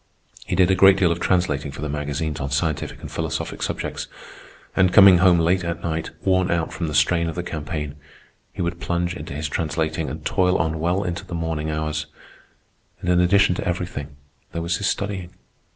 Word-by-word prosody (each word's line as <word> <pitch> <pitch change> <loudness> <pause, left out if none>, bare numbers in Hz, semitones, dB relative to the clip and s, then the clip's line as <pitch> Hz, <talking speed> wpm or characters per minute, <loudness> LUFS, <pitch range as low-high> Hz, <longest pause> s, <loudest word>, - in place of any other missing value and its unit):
He - - -1
did 95 0 +4
a - - +4
great 95 +1 +7
deal 90 -3 +3
of 85 - -1
translating 85 -6 0
for 70 +2 -7
the - - -1
magazines 75 +1 -3
on 70 - -3
scientific 75 +2 -2
and - - -8
philosophic - - -3
subjects; - - -3 0.7
and, 95 -1 +4
coming 95 -3 +8
home 90 -1 +6
late 85 +3 +2
at 85 0 -4
night, 80 -1 -2
worn 95 -1 +2
out 85 -2 0
from 85 - -3
the 75 - -3
strain 85 +2 +3
of - - -6
the 90 - -3
campaign, 75 -3 -4 0.6
he - - -4
would 85 0 -3
plunge 85 0 -1
into 75 -3 -7
his 75 +1 -2
translating 80 +1 -2
and - - -7
toil 90 0 +2
on 80 +1 -1
well 90 +5 +1
into 90 +1 -3
the 85 - -7
morning 80 -2 -2
hours. 75 0 -2 0.9
And 90 - -1
in 90 - +4
addition 95 +2 +4
to 95 - -4
everything, 85 -5 -4 0.4
there 85 - -3
was 85 0 0
his 100 - -1
studying. 95 -3 -3
85 Hz, 200 wpm, -23 LUFS, 75-90 Hz, 0.9 s, coming